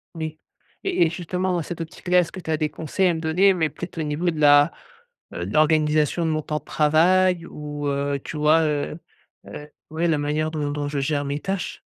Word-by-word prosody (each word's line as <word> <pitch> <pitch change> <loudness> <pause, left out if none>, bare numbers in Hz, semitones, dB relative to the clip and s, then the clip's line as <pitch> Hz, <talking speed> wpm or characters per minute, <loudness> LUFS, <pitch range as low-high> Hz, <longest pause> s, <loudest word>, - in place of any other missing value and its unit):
N 165 - -7
et 155 0 -5 0.4
et 385 - +2
et - - +1
justement 180 +2 -2
dans 175 - 0
cette 170 +1 -6
optique-là, 180 +2 0
est-ce 170 -2 0
que 190 - -8
tu 160 - -5
as 155 - +1
des 155 -1 -1
conseils 160 +5 -1
à - - +2
me 160 - -3
donner, 175 +5 +3
mais 160 -4 0
peut-être 175 +4 -9
au 160 - -1
niveau 150 +4 -1
de 160 -2 -4
la 145 +1 +6 0.6
heu, - - -4
de - - -6
l'organisation 155 +1 +2
de 160 - +1
mon 155 0 -1
temps 150 0 -3
de - - -28
travail, 170 +3 +3
ou, 145 -1 -6
heu, 140 0 -1
tu 155 - -6
vois? 155 +2 +4
Heu, 150 +1 -2 0.5
heu, 150 - -9 0.2
ouais, 165 +2 0
la 160 -2 +2
manière 150 +2 -1
dont 150 -2 -2
dont 145 0 -3
je 145 -1 -2
gère 145 +1 -1
mes 140 +1 -2
tâches? 190 +1 -4
155 Hz, 230 wpm, -23 LUFS, 150-170 Hz, 0.6 s, la